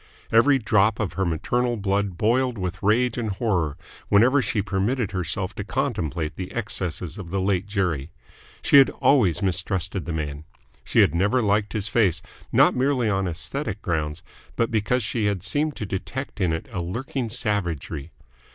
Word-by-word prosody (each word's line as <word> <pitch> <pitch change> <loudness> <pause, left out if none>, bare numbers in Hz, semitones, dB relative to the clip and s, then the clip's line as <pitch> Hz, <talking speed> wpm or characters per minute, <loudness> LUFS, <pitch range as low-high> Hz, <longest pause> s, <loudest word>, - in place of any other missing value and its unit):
Every 135 +5 +5
drop 105 -2 +2
of 105 -4 -2
her 95 -2 -1
maternal 120 +9 0
blood 100 -2 -1
boiled 125 +3 +1
with 95 0 -4
rage 115 +4 +2
and 110 -2 -2
horror 95 - -1 0.3
whenever 125 +7 +5
she 105 -4 -1
permitted 100 +4 -1
herself 95 +1 -2
to 100 - -5
contemplate 95 - -2
the 95 -1 -5
excesses 90 -6 -3
of 90 -3 -7
the 95 +2 -1
late 95 0 0
Jerry. 90 -8 -1 0.5
She - - +6
had 135 - +6
always 105 - +2
mistrusted 95 0 -1
the - - -4
man. 75 -2 -4 0.4
She - - +3
had - - +4
never 100 +9 +2
liked 105 -2 +1
his 105 -2 -1
face 95 -5 +2 0.3
not - - +5
merely 125 -3 +1
on 95 -1 0
aesthetic 105 - -4
grounds 80 -4 -2 0.3
but 115 0 0
because 115 +3 +1
she 105 +1 -1
had 100 -3 -1
seemed 150 +5 0
to 105 - -4
detect 105 +5 -5
in 90 -3 +2
it 80 0 -3
a 90 - -3
lurking 120 +7 -3
savagery. 95 - -2
100 Hz, 170 wpm, -24 LUFS, 90-115 Hz, 0.5 s, She